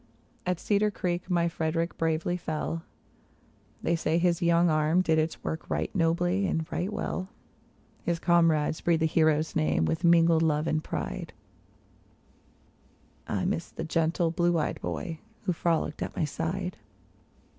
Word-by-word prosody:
At 180 -2 0
Cedar 210 0 +2
Creek 180 -2 -3
my 170 -2 +2
Frederick 165 0 -1
bravely 165 +2 0
fell; 165 -1 -3 1.0
They 170 - +2
say 165 0 0
his 170 -1 +2
young 170 0 +4
arm 155 +3 +3
did 160 -2 +3
its 155 +1 -2
work 160 - -4
right - - -1
nobly 175 +2 +1
and 160 -1 -1
right 185 +4 -2
well; 195 -3 -3 0.7
His 170 -1 -1
comrades 165 -3 +2
breathe 170 -2 +2
the - - +4
hero's 155 -1 +2
name 80 +1 +2
with 80 0 -1
mingled 170 -1 +5
love 155 -1 +2
and 155 -1 0
pride; - - -4 1.9
I 100 - -1
miss 165 - -1
the - - -6
gentle 165 +1 +1
blue 175 0 +2
eyed 155 - -2
boy, 165 -5 -4 0.2
who 185 -4 0
frolicked 165 -2 -1
at - - -4
my - - 0
side. 180 +4 -3
165 Hz, 145 wpm, -28 LUFS, 160-175 Hz, 1.9 s, mingled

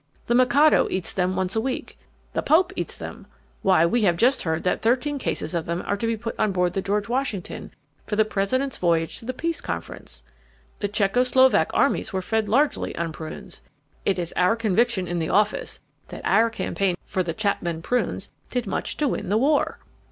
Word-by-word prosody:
The 240 - +1
Mikado 255 +5 +5
eats 185 -1 -2
them 185 0 0
once 190 +1 -1
a 220 - +2
week. 255 +2 -4 0.4
The - - 0
Pope 360 +4 +3
eats - - -4
them. - - -8 0.3
Why, 185 -4 +4
we 235 +8 +2
have 175 -5 +3
just 255 +7 +3
heard 160 -1 -1
that 180 - 0
thirteen 260 +5 +1
cases 245 - -2
of 170 -2 -1
them 170 +1 -3
are 200 - 0
to 230 +3 -2
be 230 0 0
put 230 +1 -4
on 210 - +2
board 180 -1 +1
the 195 - -1
George 205 +2 -1
Washington 240 -6 -3 0.4
for 210 - -1
the 220 0 +4
President's 240 +7 -1
voyage 165 -2 +1
to - - -12
the 255 - -1
peace 330 +1 -2
Conference. 85 -6 -6 0.6
The 205 - 0
Czecho 205 +3 +2
Slovak 260 +1 +4
armies - - +2
were 190 -2 -2
fed 220 +1 0
largely 280 +7 +1
on 170 -1 -2
prunes. 155 0 -8 0.4
It 195 - +1
is 175 -1 -3
our 180 +5 +3
conviction 225 -3 +1
in 175 0 -2
the 160 0 -2
office 210 0 +1 0.3
that - - -9
our 230 +1 +4
campaign 195 -4 -1
for 185 - -1
the 170 -2 -3
Chapman 175 -6 -1
prunes 235 -4 -1 0.2
did 250 -2 -2
much 195 - -3
to 300 - +1
win - - -2
the 205 - +3
war." 285 +5 +2
210 Hz, 200 wpm, -24 LUFS, 180-245 Hz, 0.6 s, Mikado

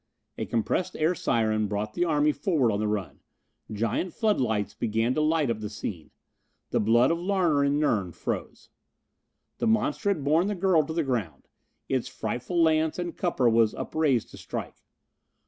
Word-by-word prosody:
A - - -3
compressed 120 +10 -1
air 160 +3 +2
siren 110 -8 0
brought 105 +1 -3
the 175 - +1
army 150 -2 +3
forward 145 - +1
on 100 - -1
the 105 - 0
run. 100 -9 -3 0.5
Giant 115 - -2
floodlights 110 - 0
began 115 +2 0
to 155 - 0
light 155 -4 +2
up 110 - -3
the 105 -1 -5
scene. 100 -5 -6 0.6
The - - +2
blood 120 +6 +4
of 165 - 0
Larner 175 -6 +2
and 140 +1 +2
Nern 105 - +1
froze. - - -5 0.9
The - - 0
monster 220 -1 +1
had 175 -8 0
borne 160 +6 +3
the 210 - -1
girl 180 -4 +3
to 160 - -4
the 165 0 0
ground. 110 - -3 0.4
Its 130 -3 -1
frightful 125 +10 -3
lance 160 -1 +2
and 175 -2 -4
cupper 165 -9 +1
was 115 -1 +3
upraised 145 -8 0
to - - -11
strike. - - -6
135 Hz, 170 wpm, -27 LUFS, 110-165 Hz, 0.9 s, blood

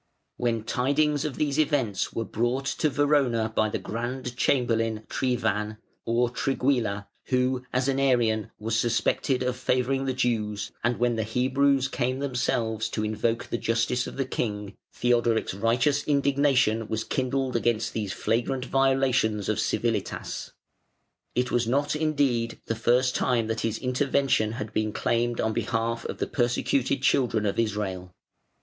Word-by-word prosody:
] - - -51
When 115 -2 0
tidings 145 +5 +1
of 145 -4 -3
these 150 -1 0
events 140 -10 +1
were 115 - -3
brought 120 +5 -1
to 155 +3 0
Verona 135 -6 +2
by 110 0 +2
the - - -2
Grand 125 +2 -4
Chamberlain 115 -4 +1
Triwan 110 -4 -1 0.3
(or 120 +1 +1
Trigguilla) 125 -7 0 0.2
who, 125 0 +1
as 130 +1 0
an 135 0 +1
Arian, 120 -5 +2
was 110 +1 -2
suspected 120 +2 +1
of 125 0 -1
favouring 130 +2 0
the 130 - 0
Jews, 110 -5 -1
and 120 +1 +1
when 120 -1 +1
the 110 - 0
Hebrews 130 +4 +2
came 130 -1 -1
themselves 115 -5 -1
to 110 - -2
invoke 110 +2 -1
the 120 - -3
justice 115 +2 0
of - - -8
the 135 - 0
King, 105 -5 -3 0.2
Theodoric's 120 -3 +1
righteous 125 +8 +1
indignation 140 -6 +2
was 110 0 -2
kindled 130 0 -1
against 115 -1 0
these 105 -4 -2
flagrant 125 +5 -1
violations 130 -6 +2
of - - 0
civilitas. - - -2 0.8
It 125 +1 0
was 120 -1 +1
not, 145 +5 +1
indeed, 140 -7 0
the - - -1
first 120 +3 +2
time 120 -3 +1
that 115 0 -2
his 115 -1 -1
intervention 130 -3 +1
had 105 -2 -5
been 110 -1 0
claimed 120 0 0
on 110 0 +1
behalf 115 +1 -1
of - - -4
the - - -1
persecuted 130 +1 0
children 120 -6 +2
of 100 - 0
Israel. 100 -5 -2
120 Hz, 150 wpm, -26 LUFS, 110-135 Hz, 0.8 s, Verona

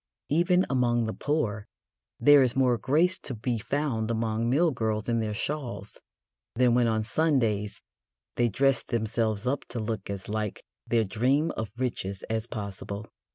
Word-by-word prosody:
Even 180 +4 +3
among 120 -3 +2
the 110 - -3
poor 110 -9 -1 0.5
there 145 -1 +7
is 125 -3 +2
more 125 -3 +3
grace 170 +9 +2
to 130 - -5
be 115 +1 -2
found 125 -3 -1
among 115 0 0
mill 160 +6 +3
girls 110 -4 -2
in 115 -1 +1
their 110 -1 -2
shawls 125 -5 -4 0.5
than 125 0 +4
when 120 -1 +3
on 110 -1 +1
Sundays 110 -5 0 0.5
they 120 -1 +2
dress 135 +3 +2
themselves 110 -1 -1
up 135 +2 0
to 120 - -5
look 110 -3 -4
as 100 -1 -5
like 105 -1 -3 0.2
their 115 -1 +3
dream 130 +10 +1
of 110 -1 -4
riches 100 -7 -3
as 110 +1 -1
possible. 100 -1 -6
115 Hz, 155 wpm, -27 LUFS, 110-135 Hz, 0.5 s, there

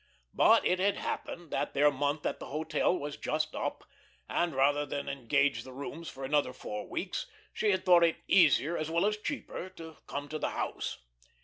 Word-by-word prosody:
But - - +5
it 180 - +2
had 200 +2 +2
happened 170 -3 -5
that - - -2
their 145 +1 +5
month 145 +2 -1
at - - -1
the - - -7
hotel 155 +4 0
was 145 -2 -5
just 155 0 -1
up, - - -3 0.4
and 170 -4 0
rather 145 +2 +3
than 145 0 -4
engage 135 -1 +1
the 130 0 -11
rooms 145 +5 -6
for 135 - -9
another 140 -1 +1
four 105 -4 -6
weeks - - -3 0.3
she 215 - +1
had 190 -2 +1
thought 175 -2 +7
it 165 -1 +3
easier 165 -3 +5
as 155 -1 -2
well 170 +3 +2
as 210 0 +2
cheaper 210 -5 -5
to 160 -1 -10
come 145 +1 -4
to 155 - -4
the - - 0
house. - - -3
155 Hz, 195 wpm, -31 LUFS, 140-170 Hz, 0.4 s, thought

